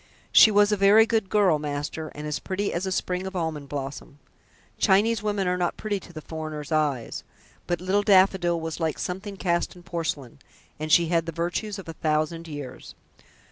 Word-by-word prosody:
She - - +8
was 205 0 +4
a 210 - +2
very 200 +3 +6
good 220 -4 0
girl, 190 -7 +3
master, 150 +2 -4
and 150 +1 -6
as 150 -1 -2
pretty 200 +1 -2
as 175 +3 -2
a - - -2
sprig 185 0 -2
of 190 - -7
almond 160 -5 -3
blossom. 140 +1 -6 0.6
Chinese 210 +2 +3
women 205 -3 -1
are 180 0 0
not 175 -1 -1
pretty 205 -2 -2
to 175 - -14
the 155 -2 -9
foreigner's 155 -2 -6
eyes, 150 -6 -1 0.4
but 175 -1 -1
little 190 +3 +1
Daffodil 190 -4 +4
was 160 0 -5
like 160 -2 -1
something 195 +2 -5
cast 175 0 -1
in 175 - -14
porcelain, 160 -7 -4 0.4
and 155 0 -4
she 170 +1 +5
had 165 -1 +1
the - - -2
virtues 175 +6 -3
of 195 - -9
a 165 - -6
thousand 155 +2 -1
years." 145 -4 -8
175 Hz, 190 wpm, -25 LUFS, 155-195 Hz, 0.6 s, She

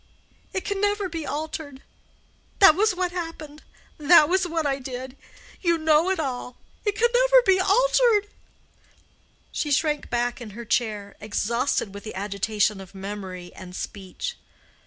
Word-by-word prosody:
It 380 - -3
can 400 -1 -2
never 410 -1 +1
be 330 -3 -5
altered. 295 -2 -5 0.7
That 390 -6 +8
was 415 +3 +2
what 360 -1 -1
happened. 325 -4 -6 0.4
That 300 0 +7
was 370 +2 +1
what 325 -2 -2
I 275 -1 0
did. 255 0 -7 0.5
You 340 -2 +2
know 315 +2 +3
it 380 - 0
all. 250 -4 -4 0.3
It 415 -2 0
can 475 - +4
never - - +5
be 380 -1 +4
altered." 435 +1 +3 1.2
She 295 - -2
sank 295 +1 +1
back 240 +1 -1
in 215 -3 -9
her 235 - -7
chair, 210 -3 -1
exhausted 220 +1 -1
with 200 - -9
the 220 - -7
agitation 205 +1 0
of 190 +1 -13
memory 190 -2 -7
and 180 -1 -10
speech. 200 - -6
295 Hz, 150 wpm, -25 LUFS, -, 1.2 s, That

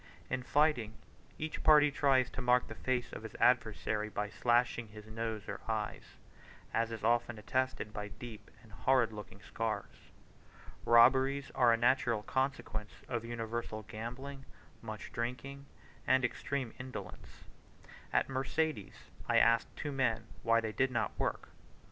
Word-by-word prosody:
In 130 - 0
fighting, 125 -6 +2 0.4
each 155 0 -4
party 150 -1 +6
tries 135 -3 +3
to 135 - -5
mark 125 0 +4
the - - -7
face 125 -2 -2
of - - -6
his 110 0 -9
adversary 110 -3 +2
by 105 0 -3
slashing 120 -1 +2
his 105 0 -12
nose 110 -1 -4
or 100 - -5
eyes; 110 -2 -3 0.6
as 115 0 +1
is 110 -2 -6
often 120 0 +2
attested 125 -1 -1
by 105 -1 -4
deep 105 0 -10
and 110 - -17
horrid 115 +2 +2
looking 105 -1 -9
scars. 115 -1 -4 0.8
Robberies 130 +4 +5
are 125 -3 +5
a 115 - +4
natural 120 -2 +2
consequence 130 -6 -3
of 120 -2 -2
universal 115 -1 -4
gambling, 125 +6 -7 0.4
much 110 -2 -7
drinking, 130 +4 -4 0.4
and 130 0 +4
extreme 130 0 -3
indolence. 125 -8 -8 0.7
At - - +2
Mercedes 135 -2 -2 0.2
I - - +4
asked 115 0 +5
two 145 - -4
men 120 -5 +1 0.2
why 115 0 +3
they 110 -1 -3
did 130 +6 +1
not 120 -3 0
work. - - -2
120 Hz, 140 wpm, -33 LUFS, 110-130 Hz, 0.8 s, party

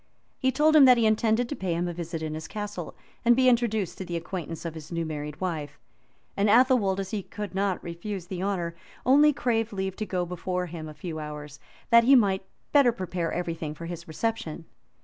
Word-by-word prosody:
He 260 - +2
told 310 +4 +3
him 290 -3 +9
that 250 -1 +7
he 230 - +3
intended 220 +2 +2
to 290 - -4
pay 185 -7 -2
him 175 +1 -1
a 175 - -3
visit 165 -1 -5
in 155 -1 -3
his 160 +1 -6
castle, 205 -4 -6 0.3
and 240 0 +6
be 255 +1 +4
introduced 230 -6 +1
to - - -3
the 175 -2 -3
acquaintance 165 -1 -6
of 165 - -3
his 160 0 -10
new 170 -1 -1
married 150 0 -5
wife; 155 -6 -3 0.6
and 200 +1 +2
Athelwold, 230 -4 +4
as 195 -1 -4
he 210 - -2
could 210 +1 -7
not 195 -1 -1
refuse 175 +2 -5
the 180 -1 -5
honor, 185 -4 -1 0.3
only 290 +4 +6
craved 230 -5 0
leave 190 -2 -3
to 215 - -2
go 180 -2 -1
before 180 +1 -3
him 160 -2 -7
a 155 - -10
few 160 -2 -6
hours, 150 -1 -7 0.3
that 235 0 +8
he 275 +2 +7
might 195 -6 +3
the - - -32 0.2
better 280 -4 +6
prepare 180 -5 -3
every 175 -1 -2
thing 155 -2 -5
for 170 - -8
his 170 0 -7
reception. 165 -2 -3
185 Hz, 220 wpm, -27 LUFS, 165-225 Hz, 0.6 s, him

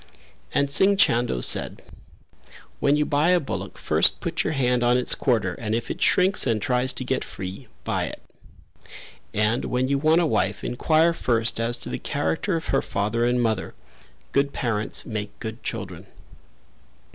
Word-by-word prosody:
And 140 0 0
Singh 195 +7 +5
Chando 120 - +2
said, - - +1 1.0
"When 140 +1 +3
you 150 - +1
buy 150 +3 +1
a 180 -1 +4
bullock 100 - -6
first - - +2
put - - -2
your - - -1
hand 125 -3 +1
on 120 +1 +3
its 125 - +3
quarter 110 -9 0
and 110 +3 -3
if 115 0 -3
it - - -7
shrinks 185 -4 +4
and 115 -3 +1
tries 125 +4 +1
to - - -1
get 130 +1 -1
free, 95 +6 -8 0.2
buy - - -1
it; - - -8 1.1
and 105 +3 0
when 125 +1 -1
you 140 0 +1
want 160 +3 +3
a 175 - +2
wife 155 - -1
enquire 160 +6 +2
first 115 -7 +1
as 115 +1 -1
to - - -3
the - - -4
character 80 - -2
of 165 - -4
her 135 - +3
father 105 +4 -1
and 120 0 +1
mother; 110 -4 -2 0.6
good 140 0 +1
parents 110 -3 -2
make 105 -2 -5
good 110 +1 -7
children." - - -6
125 Hz, 170 wpm, -24 LUFS, 110-140 Hz, 1.1 s, Singh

